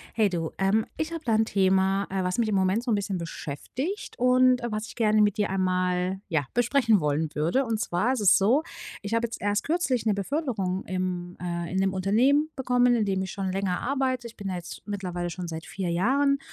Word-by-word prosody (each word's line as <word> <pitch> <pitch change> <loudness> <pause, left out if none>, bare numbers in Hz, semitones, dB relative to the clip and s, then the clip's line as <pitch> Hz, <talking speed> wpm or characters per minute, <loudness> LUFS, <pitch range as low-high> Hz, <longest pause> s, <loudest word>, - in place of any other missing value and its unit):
Hey 215 -3 +3
du. 165 -3 -3
Ähm, 200 +3 +2
ich 315 +1 -3
habe 330 -1 -5
da 230 - +2
'n 220 +1 +4
Thema, 195 -1 +2
äh, 190 -1 -1
was 180 0 -1
mich 230 -2 +2
im 210 - 0
Moment 190 +4 +2
so 245 - -3
'n 215 - +3
bisschen 200 -1 -2
beschäftigt 180 - -5
und, 255 0 +4
äh, 240 - -3
was 215 +2 -3
ich - - -12
gerne 215 -2 +3
mit 205 -1 +2
dir 205 -2 0
einmal 185 0 0
ja 155 -6 0
besprechen 240 -2 +3
wollen 150 +1 0
würde. 170 - +1
Und 225 -3 -1
zwar 195 +5 0
ist 260 - -1
es 200 -3 +6
so, 245 +11 +3 0.4
ich 205 +2 -3
habe 230 +1 +2
jetzt 235 - -8
erst 205 +1 0
kürzlich 285 -8 0
'ne 215 - +3
Beförderung 200 - -2
im, 180 -1 -3
äh 170 -1 -3
in 190 - -3
'nem 190 0 +2
Unternehmen 250 +11 +2
bekommen, 250 -2 +3
indem 195 -4 0
ich 190 - -4
schon 190 -1 -3
länger 190 -2 -1
arbeite. 260 -2 -1
Ich 230 - -11
bin 200 -2 -5
da 185 - -2
jetzt 175 - -8
mittlerweile 180 -4 -4
schon 175 +1 -5
seit 160 0 -6
4 190 -3 -4
Jahren 275 +11 +2
200 Hz, 220 wpm, -26 LUFS, 185-245 Hz, 0.4 s, es